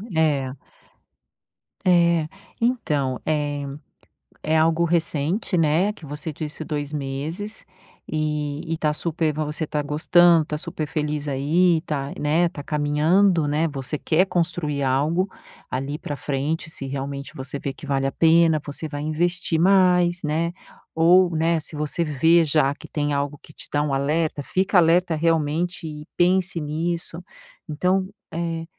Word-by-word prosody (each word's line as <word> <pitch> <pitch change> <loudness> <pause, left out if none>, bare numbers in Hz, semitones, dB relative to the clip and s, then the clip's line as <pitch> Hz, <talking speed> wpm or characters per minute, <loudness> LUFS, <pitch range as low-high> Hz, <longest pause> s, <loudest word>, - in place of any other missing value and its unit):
É. 145 -5 +1 1.3
É. 170 -3 +4 0.3
Então, 150 - 0
é 145 -2 -1 0.8
é 155 +1 0
algo 165 +1 +3
recente, 170 +3 0
né, 165 +5 +3
que 165 -6 -12
você 150 +2 -5
disse 150 +1 -6
2 145 -1 -4
meses 150 +9 -4 0.4
e 150 -1 -2
e - - -2
tá 150 -1 +1
super 160 0 -1
vo 155 0 -2
você 150 +1 -3
tá 150 - -1
gostando, 160 +2 +4
tá 150 - -3
super 155 0 -5
feliz 150 -1 -2
aí 160 +5 +2
tá, 140 -2 -3
né, 160 +4 +2
tá 145 -3 -8
caminhando, 155 +4 +2
né, 155 +3 +1
você 140 0 -4
quer 170 +6 +2
construir 165 -5 -1
algo 155 +8 +1 0.4
ali 140 +4 -3
pra 145 - -5
frente 145 +5 -2
se 140 - -7
realmente 140 +1 -5
você 135 +1 -6
vê 140 - -4
que - - -12
vale 135 -1 0
a - - -2
pena, 165 -2 +4
você 150 +2 -5
vai 145 -1 -5
investir 165 +2 0
mais, 180 -1 +4
né, 165 +3 -1 0.4
ou, 175 +1 +5
né, 165 +1 +2
se 155 - -10
você 150 +3 -1
vê 160 +3 +4
já 145 -2 +2
que - - -13
tem 145 -1 -2
algo 140 +1 -2
que - - -15
te - - -12
dá 145 - +1
um 145 - -1
alerta, 150 +2 0
fica 190 +6 +1
alerta 170 0 +4
realmente 165 +2 0
e 150 0 -8
pense 180 -1 +2
nisso. 165 +3 -3 0.5
Então, 185 +5 0 0.2
eh, 165 -1 -3
155 Hz, 150 wpm, -23 LUFS, 145-170 Hz, 1.3 s, ou